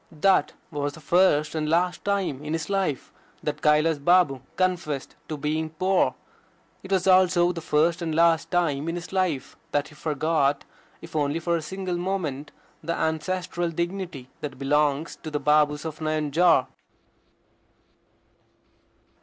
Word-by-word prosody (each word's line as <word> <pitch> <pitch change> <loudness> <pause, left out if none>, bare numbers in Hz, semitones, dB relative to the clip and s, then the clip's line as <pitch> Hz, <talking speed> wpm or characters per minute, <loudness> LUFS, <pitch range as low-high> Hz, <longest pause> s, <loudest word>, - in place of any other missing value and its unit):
That 185 +4 +2 0.2
was 145 -1 -2
the 160 - -11
first 155 -1 +3
and 155 -1 -1
last 175 +2 +1
time 195 -9 -1
in 150 +1 -3
his 165 +3 -3
life 190 -9 -1 0.3
that - - -3
Kailas 150 0 +3
Babu 155 -4 +3
confessed 175 -7 -1
to 155 - -3
being 155 +2 -1
poor. 185 +4 +1 0.7
It 190 - -11
was 190 -2 +2
also 185 -2 +5
the 170 -2 -6
first 165 +3 +1
and 160 -2 -2
last 165 0 +3
time 165 -4 0
in 165 - -2
his 175 +1 -7
life 185 -8 -1
that 145 +1 0
he - - -16
forgot, 150 -2 0 0.4
if - - -11
only 145 0 +1
for 170 +1 0
a 165 - -1
single 185 +2 -4
moment, 170 -7 -3 0.3
the 170 +2 -2
ancestral 175 +2 -1
dignity 170 -5 -4
that 150 - -6
belongs 145 +2 +1
to 160 - -7
the 150 -1 -2
Babus 150 +1 +2
of 155 -1 -5
Nayanjore. 155 0 +2
160 Hz, 145 wpm, -25 LUFS, 150-175 Hz, 0.7 s, also